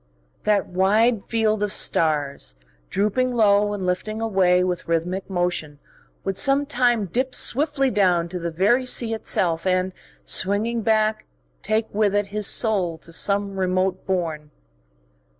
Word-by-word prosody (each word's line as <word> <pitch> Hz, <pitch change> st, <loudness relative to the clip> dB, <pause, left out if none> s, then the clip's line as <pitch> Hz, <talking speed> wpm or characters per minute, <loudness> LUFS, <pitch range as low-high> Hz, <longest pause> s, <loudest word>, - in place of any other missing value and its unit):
That 210 Hz, -2 st, +2 dB
wide 205 Hz, +4 st, +1 dB
field 220 Hz, -2 st, 0 dB
of 210 Hz, -1 st, -1 dB
stars, 145 Hz, -, 0 dB, 0.3 s
drooping 245 Hz, +6 st, 0 dB
low 205 Hz, -2 st, +3 dB
and 200 Hz, -3 st, -4 dB
lifting 215 Hz, +4 st, -3 dB
away 190 Hz, -5 st, +2 dB
with 180 Hz, -1 st, -3 dB
rhythmic 175 Hz, +4 st, -2 dB
motion, 175 Hz, -5 st, -2 dB, 0.5 s
would 195 Hz, -1 st, -1 dB
sometime 260 Hz, -5 st, +2 dB
dip 255 Hz, +8 st, -2 dB
swiftly 275 Hz, -1 st, +2 dB
down 180 Hz, -4 st, +2 dB
to 180 Hz, +1 st, -5 dB
the 170 Hz, 0 st, -3 dB
very 200 Hz, +10 st, +1 dB
sea 235 Hz, -2 st, +2 dB
itself 175 Hz, -5 st, -1 dB
and, 185 Hz, 0 st, 0 dB, 0.3 s
swinging 215 Hz, +5 st, +1 dB
back, 215 Hz, 0 st, 0 dB, 0.3 s
take 215 Hz, +1 st, 0 dB
with 205 Hz, -1 st, +1 dB
it 205 Hz, 0 st, +1 dB
his 210 Hz, -1 st, +2 dB
soul 190 Hz, -8 st, +2 dB
to 165 Hz, +1 st, -14 dB
some 200 Hz, +2 st, -1 dB
remote 185 Hz, 0 st, -1 dB
bourne.... 165 Hz, -5 st, -3 dB
200 Hz, 135 wpm, -22 LUFS, 180-220 Hz, 0.5 s, low